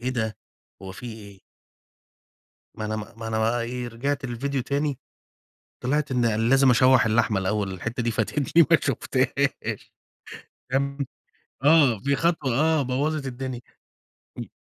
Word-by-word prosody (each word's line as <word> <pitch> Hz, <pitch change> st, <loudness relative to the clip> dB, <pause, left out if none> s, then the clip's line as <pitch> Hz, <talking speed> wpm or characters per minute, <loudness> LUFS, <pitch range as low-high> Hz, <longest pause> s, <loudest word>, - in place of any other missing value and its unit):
إيه 125 Hz, -, -2 dB
ده! 110 Hz, -4 st, -2 dB, 0.5 s
هو 95 Hz, -, -7 dB
في 120 Hz, +6 st, -9 dB
إيه؟ 100 Hz, -3 st, -12 dB, 1.3 s
ما 110 Hz, -, -5 dB
أنا 110 Hz, 0 st, -2 dB
ما 115 Hz, +2 st, -8 dB
أنا 110 Hz, -, -1 dB
بقى 115 Hz, +2 st, +1 dB
إيه، 125 Hz, +1 st, -4 dB
رجعت 140 Hz, +4 st, -3 dB
للفيديو 130 Hz, +2 st, -2 dB
تاني، 140 Hz, 0 st, -1 dB, 0.8 s
طلعت 145 Hz, +3 st, 0 dB
إن 115 Hz, -3 st, +1 dB
لازم 135 Hz, 0 st, +5 dB
أشوح 130 Hz, -1 st, +5 dB
اللحمة 110 Hz, -2 st, +2 dB
الأول 100 Hz, +1 st, -1 dB
الحتة 115 Hz, +7 st, -4 dB
دي 115 Hz, -, 0 dB
فاتتني 140 Hz, +9 st, +2 dB
ما -, -, +7 dB
شُفتهاش. -, -, -1 dB, 0.8 s
تمام، 140 Hz, +1 st, 0 dB, 0.7 s
آه، 145 Hz, -7 st, +5 dB
في 140 Hz, 0 st, +2 dB
خطوة 165 Hz, -6 st, 0 dB
آه، 160 Hz, -1 st, +3 dB
بوَّظت 140 Hz, +3 st, -1 dB
الدنيا. 130 Hz, -1 st, -5 dB, 0.8 s
امم. -, -, -6 dB
125 Hz, 135 wpm, -25 LUFS, 110-140 Hz, 1.3 s, ما